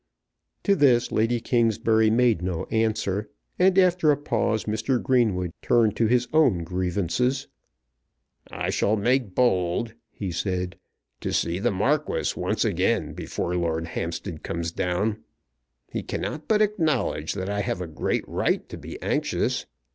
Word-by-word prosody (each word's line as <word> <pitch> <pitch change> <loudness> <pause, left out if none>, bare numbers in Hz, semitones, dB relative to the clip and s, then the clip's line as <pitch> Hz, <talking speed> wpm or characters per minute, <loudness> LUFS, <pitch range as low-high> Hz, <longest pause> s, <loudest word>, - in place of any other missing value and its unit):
To 200 - +3
this 125 -7 +3
Lady 115 +2 +1
Kingsbury 115 -2 +2
made 115 -4 +3
no 90 -2 -2
answer; 110 -2 0 0.3
and 185 +1 +4
after 180 -4 +4
a 145 - +4
pause 110 -6 0
Mr. 110 +4 0
Greenwood 105 -10 +1
turned 115 -4 +3
to 115 - +3
his 125 +1 +2
own 130 - +4
grievances. 95 +9 -1 1.0
"I - - -3
shall 105 - +2
make 120 -2 +1
bold," 110 -2 +1 0.2
he 100 -3 -5
said, 90 +1 -2 0.4
"to - - -3
see 85 +2 0
the 120 +4 +1
Marquis 135 +10 0
once - - 0
again - - 0
before 90 - -3
Lord 85 -1 -1
Hampstead 85 +1 -4
comes 85 0 -3
down. 95 +5 -1 0.7
He - - -1
cannot 155 - -4
but 215 -1 +4
acknowledge 155 - 0
that 95 -1 -3
I 100 0 -1
have 100 - -2
a 90 - -3
great 80 -2 -2
right - - 0
to - - -8
be - - -8
anxious. - - -1
110 Hz, 145 wpm, -25 LUFS, 90-125 Hz, 1.0 s, and